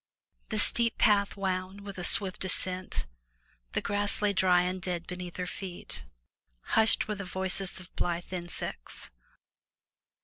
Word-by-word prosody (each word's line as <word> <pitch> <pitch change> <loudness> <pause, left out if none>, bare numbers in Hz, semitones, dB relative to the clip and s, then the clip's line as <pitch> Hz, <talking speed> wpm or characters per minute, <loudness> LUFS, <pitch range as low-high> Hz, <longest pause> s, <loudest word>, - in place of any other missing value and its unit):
The 215 - -2
steep 230 +2 +2
path 205 -2 +3
wound 190 0 -2
with 200 -2 -8
a - - -4
swift 190 +1 +4
ascent; 185 0 +1 0.7
the - - 0
grass 205 0 +2
lay 210 -1 +2
dry 180 -2 +4
and 180 +1 -2
dead 175 -1 -2
beneath 180 -1 -7
her 180 - -2
feet; 180 - -6 0.7
hushed 220 0 +5
were 210 - -1
the 200 -1 -5
voices 190 +1 -1
of 180 -1 -14
blithe 175 +1 -2
insects. 175 - -6
185 Hz, 140 wpm, -30 LUFS, 180-200 Hz, 0.7 s, hushed